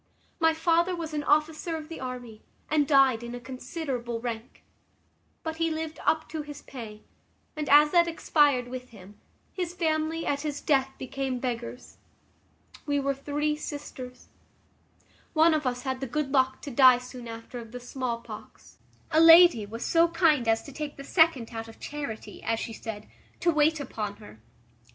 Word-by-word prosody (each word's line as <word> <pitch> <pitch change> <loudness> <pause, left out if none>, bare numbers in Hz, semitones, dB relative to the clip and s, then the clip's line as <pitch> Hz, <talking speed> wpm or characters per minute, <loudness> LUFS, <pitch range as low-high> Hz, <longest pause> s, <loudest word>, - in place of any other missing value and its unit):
My 325 -1 +3
father 340 +2 +2
was 325 -2 -6
an 295 -1 -2
officer 310 +2 +1
of 310 -1 -8
the 330 - -8
army, 245 -4 -7 0.3
and 300 -2 +3
died 270 -5 +5
in 240 0 -6
a - - -6
considerable 255 -2 -5
rank: 230 -1 -6 0.8
but 320 -1 -4
he 330 0 +1
lived 315 0 -4
up 315 0 +1
to 315 -1 -4
his 295 -1 -9
pay; 220 -5 -9 0.5
and, 305 -1 -3
as 295 +1 +7
that 345 -1 +5
expired 290 -6 +2
with 250 0 -7
him, 205 -1 -15 0.3
his 355 -2 -4
family, 320 -1 0
at 285 0 0
his 295 -1 -3
death, 270 -3 +2
became 265 0 -3
beggars. 245 0 -5 0.9
We 285 -1 +1
were 275 0 0
three 295 +2 -1
sisters. 285 -4 -8 1.0
One 320 +1 +5
of 305 -3 0
us 250 0 -2
had 260 -1 -2
the 270 - -2
good 275 +2 -2
luck 260 -1 +2
to 285 - -6
die 255 0 +7
soon 250 -1 -9
after 230 +2 -8
of 230 -2 -10
the 250 - -7
small 245 -1 -4
pox; - - -12 0.3
a 315 - +4
lady 330 - +8
was 230 +3 -6
so 335 0 +4
kind 325 -7 +2
as 225 0 +2
to 280 - -10
take 295 +1 -6
the 275 - -8
second 300 -7 +3
out 225 0 -5
of 225 - -14
charity, 285 -7 -6
as 225 0 -1
she 225 - -5
said, 215 -1 -7 0.3
to 345 - +3
wait 310 0 +3
upon 215 -7 -4
her. 205 - -14
275 Hz, 175 wpm, -27 LUFS, 245-315 Hz, 1.0 s, lady